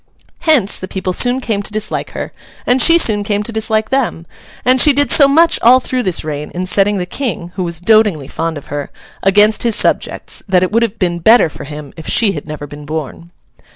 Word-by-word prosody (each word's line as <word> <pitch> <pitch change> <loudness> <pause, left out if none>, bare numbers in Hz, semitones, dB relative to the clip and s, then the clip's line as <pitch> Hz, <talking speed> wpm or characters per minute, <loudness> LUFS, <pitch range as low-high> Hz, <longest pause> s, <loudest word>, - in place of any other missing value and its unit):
Hence, 300 - +1
the 185 - -7
people 185 -1 -3
soon 245 +6 +1
came 215 -5 -2
to 205 - -6
dislike 215 0 -4
her, - - -6 0.3
and 250 +1 +2
she 335 0 +6
soon 210 -10 +2
came 205 0 -1
to 230 - -6
dislike 220 0 -1
them; 255 -11 -1 0.4
and 255 +1 +4
she 295 - +6
did 285 -2 +1
so 280 - +6
much 325 +4 +3
all 250 +3 +6
through 255 0 -2
this 185 -7 -2
reign 150 -1 -5
in 180 +1 -3
setting 200 +2 +1
the 180 - -3
King 180 -5 -4
(who 185 - -3
was 170 -2 -4
dotingly 200 -7 +2
fond 165 +1 -4
of 145 - -10
her) 145 -1 -4 0.3
against 205 +2 +3
his 230 -3 +1
subjects, - - -1
that 185 -1 +3
it 185 - -1
would 230 +2 +2
have 230 -1 -1
been 175 -2 -1
better 220 0 +5
for - - -9
him 150 -1 -9
if 160 - -9
she 220 -4 +3
had 150 -4 -7
never 150 -1 -7
been 145 0 -11
born. 160 +2 -6
205 Hz, 225 wpm, -15 LUFS, 170-235 Hz, 0.4 s, she